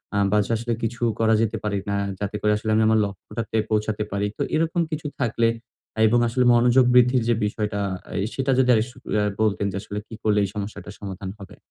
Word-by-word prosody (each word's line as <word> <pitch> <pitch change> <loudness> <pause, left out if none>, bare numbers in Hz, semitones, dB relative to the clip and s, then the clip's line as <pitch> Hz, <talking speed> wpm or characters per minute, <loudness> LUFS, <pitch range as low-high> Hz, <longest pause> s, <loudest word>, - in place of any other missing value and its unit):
আ - - +2
বা 105 - +3 0.2
আসলে 115 +1 -2
কিছু 115 +1 -3 0.2
করা 110 0 +3
যেতে 110 0 0
পারে 105 -1 -1
কিনা, 100 0 -2 0.2
যাতে 100 0 -3
করে 105 - +2
আসলে 110 +1 -4
আমি 110 - +4
আমার 110 0 +4
লক্ষ্যটাতে 105 +3 -5
পৌঁছাতে 105 0 0
পারি? 100 +1 -1
তো - - -5
এরকম 165 +2 +1
কিছু 155 -1 -3
থাকলে 115 -2 +1 0.6
এবং 120 +3 +3
আসলে 125 +2 +1
মনোযোগ 120 +2 +5
বৃদ্ধির 125 0 +5
যে - - +5
বিষয়টা, 105 0 -2 0.4
এ - - -1 0.2
সেটা 135 0 0
যদি 130 -1 +3
আর - - +3
সু - - -21 0.2
এ - - +1 0.2
বলতেন 105 -2 +1
যে, - - -7
আসলে 105 - -7
কী 110 - -9
করলে 105 -1 +3
এই 100 - -1
সমস্যাটার 100 0 -6
সমাধান 95 -1 -6
হবে? 100 -1 -12
110 Hz, 210 wpm, -23 LUFS, 105-120 Hz, 0.6 s, মনোযোগ